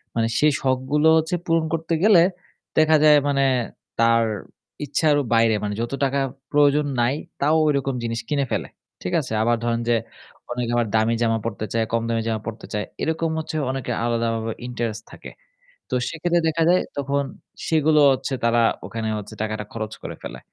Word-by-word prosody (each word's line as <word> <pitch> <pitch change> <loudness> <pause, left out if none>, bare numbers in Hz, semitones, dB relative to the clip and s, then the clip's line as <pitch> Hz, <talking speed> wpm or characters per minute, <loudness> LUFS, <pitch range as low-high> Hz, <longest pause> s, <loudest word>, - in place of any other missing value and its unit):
মানে 115 -1 +2
সেই 150 0 +4
শখগুলো 135 +4 +1
হচ্ছে 160 +3 0
পূরণ 165 -1 +2
করতে 165 0 -1
গেলে 200 -6 +7 0.5
দেখা 155 0 +5
যায় 150 -1 +7
মানে 140 -1 +2 0.5
তার 115 0 +4 0.6
ইচ্ছারও 145 -1 +2
বাইরে 115 -1 +4
মানে 105 - -2
যত 120 - -3
টাকা 140 +1 +1 0.3
প্রয়োজন 145 0 +4 0.2
নাই 120 +4 +2 0.3
তাও 150 +3 +3
ঐরকম 135 -2 0
জিনিস 115 0 -2
কিনে 140 -2 +1
ফেলে। - - -1 0.4
ঠিক 180 - -3
আছে? 130 -5 -6
আবার 120 +1 +2
ধরেন 115 0 0
যে 120 - +4 0.6
অনেকে 120 -1 -2
আবার 120 -1 +1
দামি 110 +1 +2
জামা 115 -1 +2
পড়তে 110 -1 -3
চায়, 115 -1 +1
কম 115 0 +1
দামি 115 -1 0
জামা 110 -1 -1
পড়তে 115 0 -6
চায়। 105 0 -1 0.2
এরকম 160 +1 0
হচ্ছে 160 - -5 0.2
অনেকের 130 -2 -3
আলাদাভাবে 115 -1 -1 0.2
ইন্টারেস্ট 115 -3 -4
থাকে। - - -10 0.6
তো - - -1
সেক্ষেত্রে 170 +1 0
দেখা 160 +1 0
যায় 180 - +4
তখন 140 0 0 0.4
সেগুলো 155 -1 +3
হচ্ছে 135 +1 -2
তারা 115 0 +3 0.2
ওখানে 115 -1 -4
হচ্ছে 105 0 -9
টাকাটা 110 -1 -3
খরচ 110 -1 -5
করে - - -6
ফেলে। - - -7
130 Hz, 170 wpm, -23 LUFS, 115-150 Hz, 0.6 s, গেলে